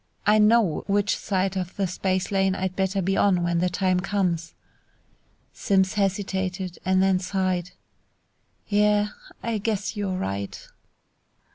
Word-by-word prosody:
I 215 +1 +5
know 210 -5 +3
which 205 0 +2
side 190 -1 -1
of 180 -1 -4
the 200 - 0
space 185 +1 -1
lane 195 -1 +2
I'd 190 -1 -3
better 190 0 0
be 195 +2 +1
on 185 -4 +3
when 170 0 +1
the 180 +1 +1
time 185 0 +1
comes!" 180 -4 -1 1.0
Simms 190 -2 +1
hesitated 190 -2 -2
and 185 +1 +3
then 190 -1 +3
sighed, 185 -1 -1 1.0
"Yeah, 210 0 +3 0.3
I 230 -2 -1
guess 210 0 -2
you're 195 -3 -2
right." 100 - -4
190 Hz, 135 wpm, -25 LUFS, 185-205 Hz, 1.0 s, I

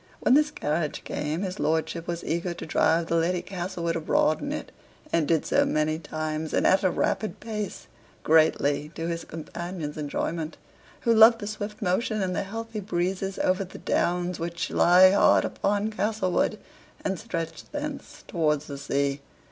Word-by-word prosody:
When - - +3
this 300 +2 +5
carriage 155 - -2
came, 150 +5 -3
his 185 -1 -4
lordship 160 +2 -1
was 170 0 -3
eager 170 +1 -2
to - - -7
drive 165 +1 +2
the 165 +1 0
Lady 175 +2 +1
Castlewood 175 -3 -3
abroad 155 -1 +2
in 285 - -3
it, 300 - -5 0.4
and 160 -3 +2
did 165 -2 +2
so - - +3
many 155 +1 0
times, 155 0 -3
and - - +2
at 190 - +5
a 185 - +4
rapid 215 +4 -1
pace, 210 -2 -5 0.4
greatly 150 -2 +3
to 165 - -4
his 170 -1 -3
companion's 165 -1 -6
enjoyment, 155 +2 -3 0.4
who 235 - +3
loved 225 +1 +8
the 205 - -6
swift 210 0 -5
motion 215 +4 0
and 180 -1 -1
the - - 0
healthy 225 +2 -5
breezes 190 0 -2
over 185 +1 +1
the 185 - -10
downs 175 0 0
which 170 +1 -3
lie 185 +2 +7
hard 200 - +5
upon 205 +2 0
Castlewood, 210 -3 0 0.5
and 190 -2 -1
stretch 165 -7 -5
thence 295 -1 -6
towards 150 -4 0
the 140 -2 -7
sea. 140 0 -1
175 Hz, 165 wpm, -26 LUFS, 160-200 Hz, 0.5 s, loved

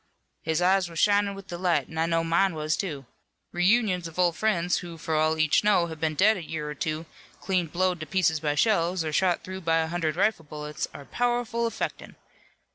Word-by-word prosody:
"His 160 +2 0
eyes 185 -1 +3
were 165 - -11
shinin' 205 +3 +2
with 195 -1 -10
delight 175 0 0
an' 160 - -6
I 165 - +2
know 165 0 +1
mine 170 +2 +2
was, 155 0 -1
too. 145 -8 -4 0.5
Reunions 180 -1 +2
of 165 - -12
old 175 -2 +2
friends 180 -5 +1
who 170 -2 -8
for 160 0 -4
all 155 +1 +2
each 155 +3 +3
know 205 -4 +4
have 160 -2 -8
been 155 -1 -1
dead 210 +6 +4
a 180 - -6
year 155 -1 -5
or 150 - -4
two, 155 +2 -3 0.3
clean 185 -3 0
blowed 180 +2 0
to 155 - -6
pieces 160 -2 +1
by 150 -1 -1
shells, 175 -1 +2
or 155 - -3
shot 180 +1 +1
through 190 0 -7
by 165 -1 +2
a 160 0 +1
hundred 165 -3 -1
rifle 190 -3 +1
bullets 150 0 -5
are 140 - -11
powerful 240 - -1
affectin'. - - -5
170 Hz, 210 wpm, -26 LUFS, 160-190 Hz, 0.5 s, know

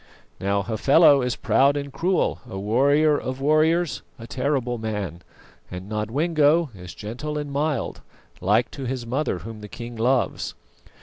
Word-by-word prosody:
Now 100 +1 0
Hafela 140 - +5
is 125 -2 -1
proud 135 +4 +3
and 140 -1 -5
cruel, 180 +6 0
a 95 - -6
warrior 140 +9 +3
of 130 +1 -5
warriors, 155 +3 +2 0.2
a 115 - -9
terrible 125 -2 -1
man, 105 -6 -4 0.5
and 90 +1 -7
Nodwengo 145 +8 +1
is 90 -2 -10
gentle 125 +9 -5
and 145 -1 -4
mild, 145 -2 -2 0.4
like 105 +6 +2
to 135 - -6
his 125 -1 -3
mother 130 -2 -1
whom 110 -1 -8
the 105 - -9
king 120 +2 -8
loves. 125 +3 0
130 Hz, 145 wpm, -24 LUFS, 110-145 Hz, 0.5 s, Hafela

